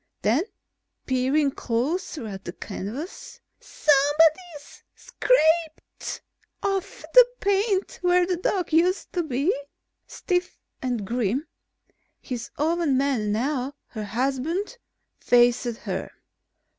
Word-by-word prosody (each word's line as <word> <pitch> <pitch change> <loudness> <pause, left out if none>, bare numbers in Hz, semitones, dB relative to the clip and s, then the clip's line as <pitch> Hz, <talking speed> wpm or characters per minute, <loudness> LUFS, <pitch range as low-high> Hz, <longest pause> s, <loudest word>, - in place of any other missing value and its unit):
Then, 250 - +2 0.6
peering 270 +3 +2
closer 270 +4 -2
at 195 -3 -7
the 175 - -5
canvas: 225 - -7 0.2
"Somebody's 300 +2 +2
scraped 325 -9 0 0.4
off 390 -2 -2
the - - +10
paint 400 0 0
where 360 0 +4
the 360 -1 -1
dog 365 -1 -1
used 355 +4 +2
to 355 - +1
be." 300 +3 0 0.5
Stiff 355 -1 -2 0.2
and 245 -5 -2
grim, 240 +5 -1 0.7
his 245 -2 -6
own 315 -2 +1
man 260 -7 +1
now, 260 +4 -1 0.2
her 215 -3 -5
husband 275 - -2 0.4
faced 245 0 +4
her. 270 - -4
290 Hz, 100 wpm, -25 LUFS, 245-355 Hz, 0.7 s, the